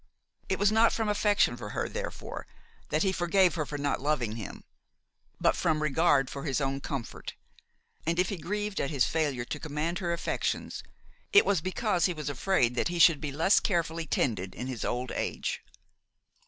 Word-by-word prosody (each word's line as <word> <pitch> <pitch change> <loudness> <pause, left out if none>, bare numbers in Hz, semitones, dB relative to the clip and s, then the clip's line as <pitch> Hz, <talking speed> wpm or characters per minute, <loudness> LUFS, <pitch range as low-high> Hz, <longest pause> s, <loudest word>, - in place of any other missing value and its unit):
It 190 - +1
was 205 +1 +3
not 225 +1 +5
from 225 -1 -1
affection 205 0 +3
for - - -7
her, - - 0
therefore, - - -6 0.4
that - - +1
he 190 - +2
forgave 180 +1 +3
her 155 -4 -2
for 145 - -4
not 145 -2 -1
loving 130 -7 0
him, 110 -4 -7 0.8
but - - +3
from 155 -1 +1
regard 145 -2 +3
for 140 +2 -6
his 140 -3 0
own 135 0 -1
comfort: 135 -5 -5 0.7
and 170 +1 +1
if 180 0 +2
he 200 - -3
grieved 205 +4 -2
at 140 - -1
his 140 -5 +2
failure 145 -7 -1
to 150 - -5
command 155 +3 -2
her 175 -2 -1
affections, 170 - -2 0.5
it 405 - +7
was 195 -5 +2
because 185 0 0
he 180 - 0
was 150 -2 -3
afraid 130 -4 +2
that 125 - 0
he 175 0 -3
should 165 -3 +6
be 150 -3 -3
less 160 +8 +4
carefully 165 -4 -1
tended 100 -10 -1
in 125 - -5
his 130 -4 -4
old 125 0 -2
age. - - -2
160 Hz, 185 wpm, -29 LUFS, 140-185 Hz, 0.8 s, it